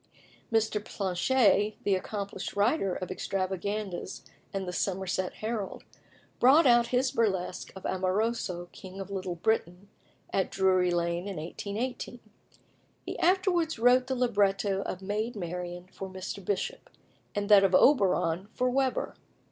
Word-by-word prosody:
Mr. 220 -2 +1
Planché, 205 +2 +2
the 200 - +2
accomplished 200 +1 -4
writer 205 - +2
of 185 - -5
extravaganzas 190 +1 -3 0.3
and 195 -1 -3
the 180 - -4
Somerset 185 -1 -1
Herald, 215 -2 -4 0.6
brought 280 +6 +6
out 240 -2 +5
his 255 +2 +1
burlesque 190 -5 -1
of 190 - -9
"Amoroso, 185 -1 -1
King 190 +1 -10
of 195 0 -6
Little 185 -2 -3
Britain," 180 0 -1 0.4
at 190 - +1
Drury 185 -2 +3
Lane 170 +1 -1
in 200 - -4
1818. 215 +10 -4 0.9
He - - -5
afterwards 355 -3 +2
wrote 250 +2 +4
the 260 - -1
libretto 200 -5 +1
of 190 -1 -5
"Maid 215 +4 -2
Marian" 175 -1 -5
for 190 0 -7
Mr. 190 +1 -6
Bishop, 200 +1 -3 0.5
and 205 0 -1
that 205 -2 +8
of 190 -1 +4
"Oberon" 190 - +3
for 255 0 +1
Weber. 265 0 0
200 Hz, 130 wpm, -29 LUFS, 185-230 Hz, 0.9 s, that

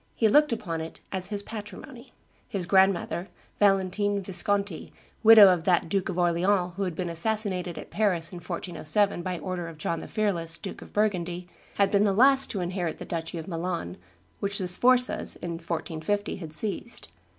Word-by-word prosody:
He 225 - +3
looked 295 +6 +4
upon 175 -8 -3
it 160 - -8
as 185 -1 0
his 205 -1 -3
patrimony. 230 +5 -9 0.4
His 190 -3 -3
grandmother, 190 -2 +2 0.3
Valentine 200 0 +2
Visconti, 195 0 0 0.3
widow 220 -2 +9
of 180 -3 +1
that 175 -3 +2
Duke 195 +1 -1
of 180 - -4
Orleans 180 +1 +1
who 200 - -2
had 180 -3 -4
been 180 +1 -3
assassinated 180 0 -1
at - - -9
Paris 185 -6 0
in 180 - -8
1407 175 +2 -1
by 180 0 -3
order 180 -1 -4
of 165 -2 -10
John 165 +2 -2
the - - -8
Fearless, 170 -7 -1
Duke 195 - -8
of - - -12
Burgundy, 180 -4 -1 0.3
had 200 -1 +2
been 200 0 +3
the 200 -2 +2
last 270 +5 +5
to 200 - -3
inherit 175 -2 -3
the - - -8
duchy 165 0 -4
of 160 - -7
Milan, 170 - -4 0.4
which 200 0 -2
the 185 - -2
Sforzas, 250 +7 +3
in 175 - -6
1450, 170 +4 -3
had 165 -5 -8
seized. 215 +7 -4
185 Hz, 175 wpm, -27 LUFS, 170-205 Hz, 0.4 s, widow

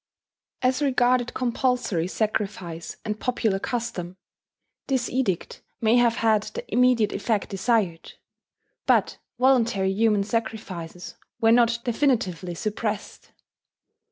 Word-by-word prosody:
As 255 +2 +2
regarded 250 -3 +2
compulsory 245 -8 0
sacrifice 195 -5 -3
and 215 -1 -3
popular 225 -5 0
custom, 195 -7 -4 0.7
this 260 -2 0
edict 240 -9 -1 0.2
may 225 +1 +3
have 235 -1 +4
had 220 -3 +3
the 485 - -7
immediate 250 -4 +4
effect 205 0 -1
desired; 195 -4 0 0.7
but - - +2 0.2
voluntary 235 -7 +3
human 210 -1 +2
sacrifices 200 -6 -5 0.2
were 225 -1 +4
not 235 0 +4
definitively 220 - 0
suppressed. 210 +2 -4
225 Hz, 100 wpm, -25 LUFS, 195-245 Hz, 0.7 s, have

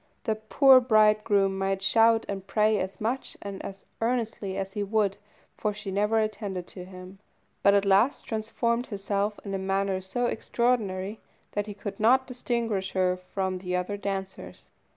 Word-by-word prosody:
The 220 - +1
poor 255 +5 +6
bridegroom 215 -4 +3
might 195 0 -1
shout 225 +2 +4
and 195 -1 -5
pray 215 +1 +2
as 190 +1 -4
much 240 +5 -2
and 200 -1 -7
as 195 0 -8 0.2
earnestly 225 -5 -1
as 195 0 -4
he 210 - -3
would, 205 -1 +1 0.4
for 210 -1 -2
she 200 -2 -6
never 210 +3 +1
attended 205 -4 -2
to 180 -2 -8
him, 185 +1 -11 0.4
but 200 0 +5
at 200 0 +3
last 200 +7 +3
transformed 235 +2 -1
herself 205 0 -2
in 200 - -4
a 195 - -1
manner 195 0 0
so 215 +6 -2
extraordinary 220 -4 -1 0.3
that 205 0 -2
he 205 - -6
could 200 -1 -6
not 255 +4 +4
distinguish 235 -6 -2
her 185 -1 +2
from 185 0 -3
the 180 0 -3
other 180 +3 -2
dancers. 195 -1 -6
200 Hz, 165 wpm, -27 LUFS, 195-220 Hz, 0.4 s, poor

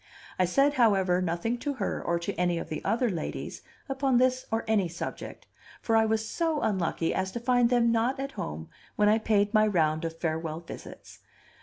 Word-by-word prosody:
I 185 - +4
said, 275 +11 +3
however, 190 -5 +3
nothing 180 +8 -1
to 285 +3 -2
her, 210 -6 -2
or 170 - 0
to 170 +4 -3
any 175 0 0
of 165 - -5
the 155 -2 -5
other 240 +2 +1
ladies, 165 -4 -5 0.3
upon 270 -2 +1
this 255 +1 +2
or 225 0 -1
any 210 -4 +2
subject, 170 +1 -7 0.3
for 225 - 0
I 220 0 +5
was 220 0 0
so 325 +1 -1
unlucky 170 -4 0
as 190 0 -1
to 235 - -3
find 245 0 +3
them 240 -2 +3
not 235 +4 +1
at 275 0 -3
home 80 - -6 0.3
when 210 0 +4
I 220 +1 +4
paid 210 -1 +1
my 215 0 +5
round 155 -5 +1
of 165 0 -4
farewell 160 -1 -3
visits. 170 - -11
215 Hz, 195 wpm, -28 LUFS, 170-240 Hz, 0.3 s, I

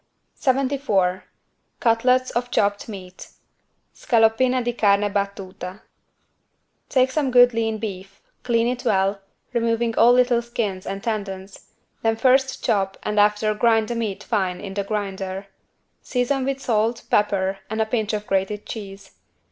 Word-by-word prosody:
74 260 -9 0 0.5
CUTLETS 250 +2 +2
OF 245 +1 -2
CHOPPED 205 -2 0
MEAT 185 -3 -9 0.7
(Scaloppine 240 +2 +2
di 240 0 -1
carne 205 -2 +2
battuta) 195 -1 -4 1.1
Take 260 0 +3
some 285 -1 0
good 245 -1 +6
lean 225 -1 -1
beef, 195 -3 -7 0.2
clean 230 -2 +1
it 245 +1 -2
well, 195 -3 +1 0.3
removing 230 -1 0
all 235 +1 +7
little 245 -1 +3
skins 215 -5 -4
and 195 0 -5
tendons, 200 -3 -5 0.3
then 225 0 +1
first 265 +2 +2
chop 195 -2 0
and 210 0 0
after 210 +1 +3
grind 225 0 +2
the 240 - -2
meat 220 -4 -3
fine 190 -5 -1
in 195 -2 -7
the 200 0 -2
grinder. 195 -2 -4 0.6
Season 260 +1 -1
with 275 0 -2
salt, 230 -1 0
pepper 195 -2 +1
and 220 +1 -3
a 220 - +3
pinch 220 -1 -1
of 210 -1 -3
grated 195 +2 -1
cheese. 200 -3 -8
220 Hz, 140 wpm, -22 LUFS, 195-240 Hz, 1.1 s, all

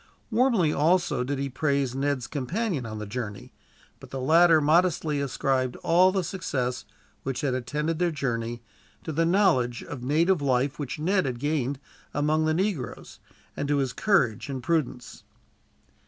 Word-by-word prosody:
Warmly, 225 - +3
also, 155 -4 +2
did 140 +2 -2
he 140 +1 -2
praise 140 -1 0
Ned's 135 -2 -1
companion 150 - -2
on 110 -1 -6
the 105 - -5
journey; 105 -2 -6 0.5
but - - -13
the 135 - -5
latter 165 +4 +5
modestly 155 -1 +2
ascribed 130 -2 0
all 180 +3 +5
the 190 -1 0
success, 135 - -3 0.4
which 135 +1 -3
had 140 -4 0
attended 150 +6 -2
their 175 -1 +2
journey, 120 -6 -3 0.4
to 160 - -4
the 165 +2 +1
knowledge 165 -11 +2
of 140 -4 -7
native 160 +6 +2
life 135 +1 0
which 140 -4 -4
Ned 185 +2 +1
had 125 -2 -3
gained 145 -2 -1 0.4
among 155 +2 +1
the 155 - +2
negroes, 180 - -3 0.4
and 145 - -3
to 145 0 +1
his 135 -3 0
courage 135 - +1
and 130 -2 -4
prudence. 135 -5 -2
145 Hz, 155 wpm, -26 LUFS, 130-165 Hz, 0.5 s, latter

